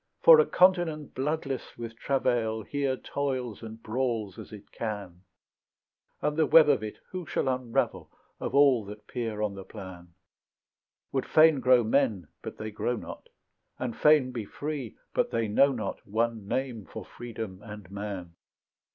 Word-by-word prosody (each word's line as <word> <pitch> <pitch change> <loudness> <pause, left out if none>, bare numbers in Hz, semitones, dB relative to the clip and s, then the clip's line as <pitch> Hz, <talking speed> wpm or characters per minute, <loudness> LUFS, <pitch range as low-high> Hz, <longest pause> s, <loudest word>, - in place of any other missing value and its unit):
For 485 -1 +10
a 465 - +4
continent 175 -5 +3
bloodless 140 -1 -3
with 115 -1 -7
travail 115 -4 0
Here 140 +1 -1
toils 130 -6 -3
and 110 0 -9
brawls 115 -4 -2
as - - -10
it 105 -1 -12
can, 100 -6 -5 1.0
And 150 0 +1
the 160 -1 +3
web 155 -2 +7
of 110 - +3
it 110 -1 -6
who 185 -4 -5
shall - - -1
unravel 125 -3 -1 0.3
Of - - -3
all 140 -5 +5
that 105 +1 -10
peer 110 -3 -3
on 105 -2 -1
the 95 -1 -8
plan; 95 -4 -11 1.0
Would 135 - -1
fain 155 -2 +6
grow 125 -2 +5
men, 110 - +1
but - - -7
they 110 0 -5
grow 120 +3 -1
not, - - -9 0.5
And 125 -3 -3
fain 150 -4 +4
be 120 -3 -4
free, 140 +1 -5 0.2
but - - +1
they 115 -1 0
know 140 +7 +4
not 110 -6 -4
One 115 0 -1
name 120 -6 -3
for - - -8
freedom 110 -5 -7
and 105 -4 -10
man? 100 -4 -6
115 Hz, 160 wpm, -28 LUFS, 105-140 Hz, 1.0 s, For